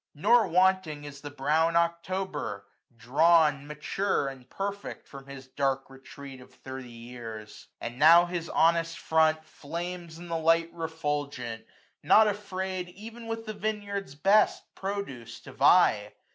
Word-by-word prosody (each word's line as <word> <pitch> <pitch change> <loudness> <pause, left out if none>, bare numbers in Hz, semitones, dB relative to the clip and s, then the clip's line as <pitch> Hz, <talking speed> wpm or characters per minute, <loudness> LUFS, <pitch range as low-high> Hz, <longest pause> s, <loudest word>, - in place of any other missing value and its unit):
Nor 215 +7 +4
wanting 180 -4 +2
is 145 -1 -10
the 145 - -7
brown 155 +4 +1
October, 170 - -2 0.3
drawn. 145 +4 +3
Mature 150 +2 -1
and 130 -2 -12
perfect^ 200 +1 -5
from 135 -1 -12
his 135 -1 -10
dark 135 0 -2
retreat 135 0 -11
520 - - -13
Of - - -17
thirty 130 -1 -7
years; 115 -2 -10
and 120 +2 -7
now 165 +3 +8
his 175 -2 -4
honest 165 0 +2
front 160 0 +2
Flames 170 +2 -7
in 175 +1 -10
the 165 -1 -2
light 165 +1 +2
refulgent, 145 -8 -4 0.3
not 220 0 +6
afraid 190 -3 -4
Ev'n 225 +2 -10
with 225 0 -4
the 215 - -5
vineyard's 205 -6 -4
best 195 +8 +3
produce 165 - -6
to - - -12
vie. - - +4
160 Hz, 140 wpm, -28 LUFS, 140-185 Hz, 0.3 s, now